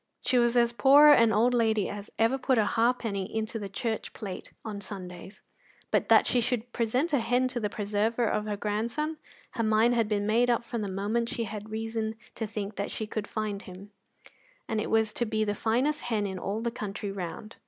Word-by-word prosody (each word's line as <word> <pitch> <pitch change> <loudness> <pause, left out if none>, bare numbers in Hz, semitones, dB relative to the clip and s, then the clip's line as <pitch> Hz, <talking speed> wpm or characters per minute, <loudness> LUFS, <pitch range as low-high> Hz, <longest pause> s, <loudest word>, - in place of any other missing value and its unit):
She 250 - +2
was 240 0 +3
as 235 -1 +4
poor 280 +4 +7
an 230 -6 +6
old 230 +4 +3
lady 220 -4 +2
as 205 0 -7
ever 230 +4 +2
put 260 -1 +2
a 215 - +4
halfpenny 225 -4 0
into 220 +1 -2
the 200 -2 -5
church 220 +3 -3
plate 195 -4 -7
on 210 -2 -5
Sundays; 190 -1 -9 0.5
but - - +1
that - - +6
she 245 - +2
should 245 0 -2
present 255 +8 0
a 285 - +4
hen 245 +2 +2
to 245 - -3
the 210 -2 -1
preserver 215 +4 0
of 210 -1 0
her 205 -1 -2
grandson, 235 +10 -2 0.3
her 230 - -2
mind 220 +2 +3
had 230 -3 +2
been 205 -1 0
made 235 +3 +3
up 235 -1 +2
from 235 -1 -4
the 205 - -2
moment 210 +5 -1
she 230 - -2
had 210 0 -6
reason 220 0 -3 0.2
to 225 - -4
think 205 -1 -4
she 220 - -4
could 210 -1 -4
find 210 -2 -3
him, 190 +2 -11 0.8
and 220 -1 -1
it - - -3
was 220 -1 +2
to 240 - -1
be 215 0 0
the 205 -1 0
finest 250 +8 0
hen 220 -4 -1
in 190 -2 -4
all 205 +4 -3
the 235 0 -1
country 205 -3 -5
round. 195 +3 -6
220 Hz, 210 wpm, -28 LUFS, 205-235 Hz, 0.8 s, poor